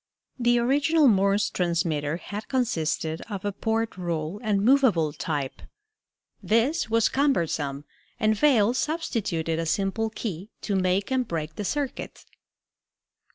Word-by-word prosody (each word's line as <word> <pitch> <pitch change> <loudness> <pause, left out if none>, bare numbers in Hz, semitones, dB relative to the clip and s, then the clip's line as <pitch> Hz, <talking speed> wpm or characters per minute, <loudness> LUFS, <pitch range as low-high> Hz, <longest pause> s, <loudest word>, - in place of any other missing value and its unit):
The 240 0 +3
original 285 +5 +3
Morse 200 -1 +3
transmitter 165 -3 0
had 205 +5 -7
consisted 165 - -1
of 200 -2 -5
a 205 - 0
porte 225 +1 -2
rule 170 +2 -3
and 210 -3 +1
movable 225 - +4
type. 145 -6 -3 0.8
This 230 +6 +1
was 230 0 +3
cumbersome, 160 - 0 0.3
and 215 -2 +3
Vail 235 -3 +4
substituted 215 - -1
a 165 - -2
simple 195 +6 0
key 205 -3 -5
to 205 - -2
make 190 +3 +1
and 255 -2 +1
break 155 -2 -4
the 210 - -4
circuit. 285 +4 -4
205 Hz, 125 wpm, -26 LUFS, 165-240 Hz, 0.8 s, movable